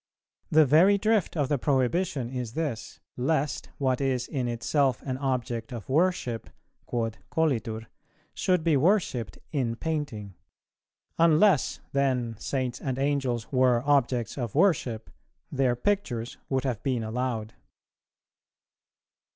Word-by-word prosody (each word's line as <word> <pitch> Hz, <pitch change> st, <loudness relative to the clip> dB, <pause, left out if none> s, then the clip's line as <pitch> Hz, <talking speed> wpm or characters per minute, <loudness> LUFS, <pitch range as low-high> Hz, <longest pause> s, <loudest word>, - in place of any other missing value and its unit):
The 155 Hz, 0 st, +6 dB
very 170 Hz, +9 st, +5 dB
drift 210 Hz, -4 st, +1 dB
of 145 Hz, -3 st, +1 dB
the 145 Hz, -1 st, 0 dB
prohibition 140 Hz, +2 st, +1 dB
is 125 Hz, -3 st, -4 dB
this, 145 Hz, -8 st, -4 dB, 0.2 s
lest 145 Hz, +3 st, -1 dB
what 130 Hz, -1 st, 0 dB
is 130 Hz, -2 st, 0 dB
in 130 Hz, -4 st, -2 dB
itself 130 Hz, +2 st, 0 dB
an 130 Hz, -1 st, -3 dB
object 125 Hz, -4 st, -2 dB
of 115 Hz, -5 st, -7 dB
worship 145 Hz, -, 0 dB, 0.4 s
(quod 115 Hz, -2 st, -2 dB
colitur) 115 Hz, -9 st, 0 dB, 0.5 s
should 180 Hz, -3 st, +1 dB
be 165 Hz, -2 st, +3 dB
worshipped 135 Hz, -, +1 dB
in 125 Hz, -6 st, -1 dB
painting; 135 Hz, -, -4 dB, 0.9 s
unless 165 Hz, 0 st, +4 dB
then 130 Hz, -4 st, 0 dB
Saints 130 Hz, -3 st, -2 dB
and 130 Hz, -2 st, -2 dB
Angels 135 Hz, -5 st, -1 dB
were 125 Hz, -2 st, +3 dB
objects 135 Hz, -3 st, +1 dB
of 120 Hz, -5 st, -4 dB
worship, 140 Hz, -, +1 dB, 0.4 s
their 130 Hz, -3 st, +2 dB
pictures 125 Hz, -, -1 dB
would 135 Hz, -1 st, 0 dB
have 125 Hz, -5 st, -2 dB
been 125 Hz, -4 st, -1 dB
allowed. 110 Hz, -1 st, -3 dB
130 Hz, 120 wpm, -27 LUFS, 120-150 Hz, 0.9 s, The